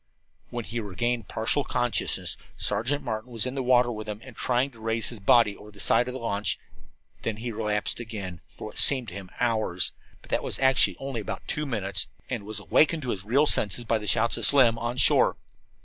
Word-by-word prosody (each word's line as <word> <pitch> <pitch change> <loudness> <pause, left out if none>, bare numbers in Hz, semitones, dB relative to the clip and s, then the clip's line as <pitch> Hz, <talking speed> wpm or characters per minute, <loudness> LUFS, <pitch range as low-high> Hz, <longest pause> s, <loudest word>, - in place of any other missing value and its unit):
When 120 -2 -5
he 120 - -4
regained 115 +3 -2
partial 115 +6 0
consciousness 120 -2 +1 0.2
Sergeant 145 +5 0
Martin 110 -1 -4
was 115 -1 +2
in 130 - -3
the 135 - -2
water 125 -1 +3
with 110 -1 -6
him, 105 0 -5
and 130 -3 -12
trying 125 +2 0
to 115 - -17
raise 115 0 -1
his 115 - -8
body 105 +1 +4
over 105 - -13
the 100 -1 -16
side 120 +4 +3
of 125 - -5
the - - -4
launch; 105 -3 0 0.6
then 110 -1 -2
he 120 +2 -4
relapsed 105 -1 -1
again, 100 -7 -6
for - - -11
what - - -5
seemed 130 -5 +4
to - - -11
him 95 -2 -8
hours, 110 -7 +1 0.3
but - - -13
what - - +1
was - - -4
actually 130 -1 +3
only 135 -4 -4
about - - -6
two 150 0 -2
minutes, 100 -7 0 0.2
and 115 -5 -3
was 110 0 -6
awakened 155 +8 +2
to 125 - -2
his 95 0 -5
real 135 +7 +3
senses 115 -3 +2
by 115 0 +1
the 105 - -7
shouts 115 +2 +2
of - - +2
Slim, 120 -5 +4
on 120 +1 -3
shore. - - +4
115 Hz, 215 wpm, -26 LUFS, 105-125 Hz, 0.6 s, body